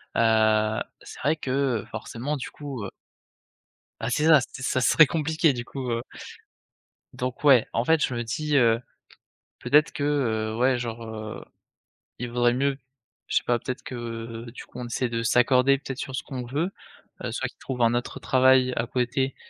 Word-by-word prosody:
heu, 110 Hz, -1 st, +3 dB, 0.2 s
c'est -, -, -11 dB
vrai 150 Hz, +4 st, +2 dB
que, 140 Hz, -, -7 dB, 0.3 s
heu, -, -, -13 dB
forcément 120 Hz, +6 st, -4 dB
du 130 Hz, -, -6 dB
coup, 140 Hz, -7 st, -7 dB
heu -, -, -5 dB, 1.1 s
Ah -, -, -2 dB
c'est 150 Hz, -, +1 dB
ça, 160 Hz, -3 st, +8 dB
ce 130 Hz, +1 st, -8 dB
ça 130 Hz, -, +1 dB
serait 155 Hz, +4 st, +6 dB
compliqué 160 Hz, 0 st, +1 dB
du 120 Hz, -1 st, -5 dB
coup, 130 Hz, -2 st, -5 dB
heu 115 Hz, 0 st, -1 dB, 1.1 s
Donc 125 Hz, +2 st, -4 dB
ouais, 135 Hz, -6 st, +6 dB
en 115 Hz, +2 st, 0 dB
fait 160 Hz, -2 st, +3 dB
je 130 Hz, -, 0 dB
me 120 Hz, -, -2 dB
dis, 150 Hz, +5 st, -1 dB
heu, 115 Hz, -2 st, +4 dB, 0.8 s
peut-être 150 Hz, +4 st, +3 dB
que, 140 Hz, -, -3 dB
heu, 110 Hz, -7 st, 0 dB
ouais 125 Hz, +1 st, +3 dB
genre, 115 Hz, -1 st, -5 dB
heu, 110 Hz, -1 st, -7 dB, 0.7 s
il 125 Hz, -, -4 dB
vaudrait 120 Hz, 0 st, +2 dB
mieux, 135 Hz, +2 st, 0 dB, 0.5 s
je -, -, +1 dB
sais -, -, +1 dB
pas 120 Hz, -, +2 dB
peut-être 130 Hz, +2 st, -5 dB
que, 125 Hz, -, -7 dB
heu, 115 Hz, 0 st, -6 dB
du 125 Hz, -, -10 dB
coup -, -, -11 dB
on -, -, -4 dB
essaie 120 Hz, +2 st, -1 dB
de 115 Hz, -1 st, -2 dB
s'accorder, 125 Hz, +3 st, +4 dB
peut-être 135 Hz, -1 st, -7 dB
sur 135 Hz, -, -5 dB
ce -, -, -2 dB
qu'on 130 Hz, -4 st, -6 dB
veut! 155 Hz, +10 st, -2 dB, 0.5 s
Heu, -, -, -3 dB
soit -, -, -2 dB
qu'ils -, -, -16 dB
trouvent 125 Hz, -2 st, -4 dB
un 115 Hz, 0 st, +4 dB
autre 120 Hz, 0 st, -3 dB
travail 130 Hz, 0 st, +4 dB
à 115 Hz, -, -1 dB
côté 130 Hz, +2 st, -1 dB
125 Hz, 190 wpm, -25 LUFS, 115-140 Hz, 1.1 s, ça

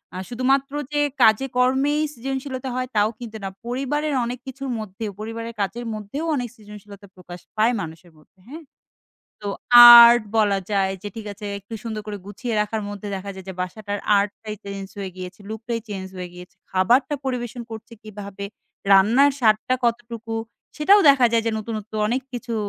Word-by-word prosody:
আর 185 Hz, -, -4 dB
শুধুমাত্র 270 Hz, +3 st, +1 dB, 0.2 s
যে 295 Hz, -, +2 dB, 0.2 s
কাজে 220 Hz, +5 st, +5 dB
কর্মেই 270 Hz, +4 st, +2 dB
সৃজনশীলতা 265 Hz, +1 st, -4 dB
হয়, 255 Hz, 0 st, -2 dB
তাও 210 Hz, +1 st, +3 dB
কিন্তু 225 Hz, -2 st, -7 dB
না। 195 Hz, -, -3 dB, 0.2 s
পরিবারের 275 Hz, +4 st, -2 dB
অনেক 245 Hz, +1 st, -5 dB
কিছুর 270 Hz, +1 st, -6 dB
মধ্যেও, 210 Hz, 0 st, -6 dB
পরিবারের 230 Hz, +1 st, -6 dB
কাজের 235 Hz, +5 st, -3 dB
মধ্যেও 215 Hz, +9 st, -5 dB
অনেক 245 Hz, -2 st, -2 dB
সৃজনশীলতা 205 Hz, -1 st, -13 dB
প্রকাশ 180 Hz, -1 st, -11 dB, 0.2 s
পায়, 225 Hz, +3 st, +3 dB
মানুষের 165 Hz, +2 st, -9 dB
মধ্যে 155 Hz, +4 st, -26 dB
হ্যাঁ? 315 Hz, +4 st, -9 dB, 0.8 s
তো 205 Hz, -, -3 dB, 0.6 s
আর্ট 235 Hz, -1 st, +6 dB, 0.2 s
বলা 205 Hz, -2 st, +3 dB
যায়, 195 Hz, -1 st, +1 dB
যে 205 Hz, -, -4 dB
ঠিক 215 Hz, -1 st, -7 dB
আছে 205 Hz, +1 st, -9 dB
একটু 200 Hz, +3 st, -10 dB
সুন্দর 215 Hz, -2 st, -4 dB
করে 205 Hz, -1 st, -5 dB
গুছিয়ে 225 Hz, +3 st, -4 dB
রাখার 215 Hz, +1 st, -2 dB
মধ্যে 205 Hz, 0 st, -7 dB
দেখা 200 Hz, +1 st, -6 dB
যায়, 190 Hz, 0 st, -11 dB
যে -, -, -4 dB
বাসাটার 205 Hz, +2 st, -4 dB, 0.2 s
আর্টটাই 210 Hz, +1 st, -3 dB
চেঞ্জ 200 Hz, -1 st, -6 dB
হয়ে 190 Hz, -1 st, -4 dB
গিয়েছে, 185 Hz, +2 st, -8 dB
লুক 220 Hz, 0 st, -6 dB
টাই 230 Hz, -1 st, -1 dB
চেঞ্জ 190 Hz, -2 st, -5 dB
হয়ে 180 Hz, -1 st, -5 dB
গিয়েছে। 180 Hz, +1 st, -13 dB, 0.2 s
খাবারটা 245 Hz, +10 st, +3 dB
পরিবেশন 245 Hz, -2 st, -3 dB
করছে 225 Hz, +2 st, -9 dB
কিভাবে, 200 Hz, -2 st, -8 dB, 0.5 s
রান্নার 235 Hz, +9 st, +5 dB
স্বাদটা, 220 Hz, +2 st, +3 dB
কতটুকু 230 Hz, -1 st, -2 dB, 0.4 s
সেটাও 390 Hz, +7 st, +5 dB
দেখা 260 Hz, -3 st, +5 dB
যায় 230 Hz, -1 st, +3 dB
যে -, -, +2 dB
নতুন, 220 Hz, +1 st, -5 dB
নতুন 215 Hz, +1 st, -9 dB
অনেক 255 Hz, +3 st, 0 dB
কিছু 240 Hz, -1 st, -5 dB
220 Hz, 170 wpm, -22 LUFS, 200-250 Hz, 0.8 s, আর্ট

